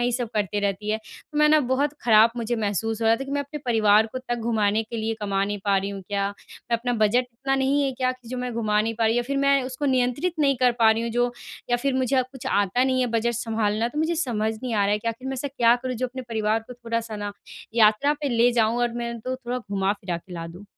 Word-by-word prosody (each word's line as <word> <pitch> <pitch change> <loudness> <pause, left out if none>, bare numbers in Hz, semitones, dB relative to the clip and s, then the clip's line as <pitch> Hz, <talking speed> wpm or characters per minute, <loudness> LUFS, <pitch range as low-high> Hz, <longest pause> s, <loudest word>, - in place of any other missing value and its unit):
ये 245 0 +1
सब 240 -1 -2
करती 205 -1 0
रहती 205 +1 -1
है। 215 - +1
तो 295 +7 -9
मैं 300 0 +5
ना, 310 - +6
बहुत 275 +3 0
खराब 225 0 +6
मुझे 235 0 -1
महसूस 220 +1 -1
हो 225 - +2
रहा 225 +1 +5
था 270 - -5
कि, 275 - -8
"मैं 285 0 0
अपने 285 +2 -6
परिवार 220 -2 +4
को 255 - -3
तक 245 -1 -3 0.2
घुमाने 215 -1 +2
के 225 +1 -7
लिए 225 0 -1
कमा 195 -1 0
नहीं 205 +1 -3
पा 200 -1 +3
रही 195 +1 -1
हूँ 195 -1 -7
क्या? 200 -1 0 0.2
मैं 235 - -3
अपना 245 +1 -2
बजट 240 +4 +3
इतना 270 +3 -1
नहीं 270 +2 +2
है 275 - +1
क्या 255 0 0
कि 250 -2 -16
जो 255 - -4
मैं 250 0 -3
घुमा 215 -2 +1
नहीं 225 +1 -1
पा 225 - +3
रही 225 +2 +2
या 240 - +2
फिर 275 +3 -3
मैं 275 -1 +3
उसको 255 +2 -5
नियंत्रित 260 +6 +1
नहीं 275 -3 +3
कर 250 0 +3
पा 225 -1 +6
रही 225 +1 +1
हूँ, 235 - -2
जो 245 +1 +1 0.4
या 245 - +4
फिर 270 +2 -1
मुझे 260 0 +2
कुछ 265 - -9
आता 205 +6 +2
नहीं 260 -1 +1
है 250 - +2
बजट 235 +1 +1
संभालना?" 225 -1 0
तो 295 +5 -6
मुझे 320 +2 +1
समझ 225 -9 -1
नहीं 245 -3 -2
आ 200 -1 +2
रहा 205 - +2
है 210 - +1
कि 230 - -3
आखिर 240 +4 -5
मैं 270 - -2
ऐसा 275 +2 -3
क्या 240 -3 +4
करूँ 255 -1 -2
जो 255 +2 -1
अपने 260 +1 -7
परिवार 220 0 0
को 250 - -9
थोड़ा-सा 230 -2 -4
ना, 205 0 -4 0.4
यात्रा 220 +6 +4
पे 290 - -1
ले 240 0 +3
जाऊँ 230 0 +2
और 240 -1 0
मैं 235 0 -3
उनको 255 +3 -4
थोड़ा 250 -1 -4
घुमा-फिरा 195 -4 -2
के 180 +2 -12
ला 165 0 -5
दूँ? 180 +4 -11
235 Hz, 275 wpm, -24 LUFS, 215-255 Hz, 0.4 s, ना